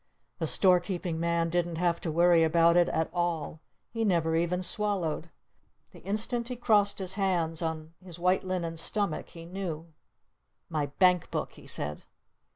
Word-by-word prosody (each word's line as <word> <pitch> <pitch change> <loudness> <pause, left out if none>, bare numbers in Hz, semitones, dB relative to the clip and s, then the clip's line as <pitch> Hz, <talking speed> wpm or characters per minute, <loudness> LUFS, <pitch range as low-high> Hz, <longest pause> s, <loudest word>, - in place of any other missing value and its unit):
The - - -1
Store 185 -2 +4
Keeping 175 -2 -4
Man 170 0 0
didn't 175 -1 0
have 170 0 0
to 165 - -2
worry 170 +1 +5
about 165 +1 +4
it 175 0 +4
at 160 0 0
all. 175 -3 -2 0.3
He 225 -1 -2
never 165 -5 +2
even 175 +2 0
swallowed. 180 -6 0 0.6
The - - -14
instant 220 +5 -2
he 250 - -4
crossed 205 -4 +2
his 190 -1 -3
hands 175 -5 0
on 160 -1 -4
his 175 -3 -8
white 180 +2 +2
linen 175 -3 -3
stomach 200 0 -2
he 165 -1 -11
knew! 170 -3 -6 0.8
"My 155 -3 -1
Bank 180 +4 +3
Book!" - - -3
he - - -15
said. 75 +1 -2
175 Hz, 165 wpm, -29 LUFS, 165-190 Hz, 0.8 s, worry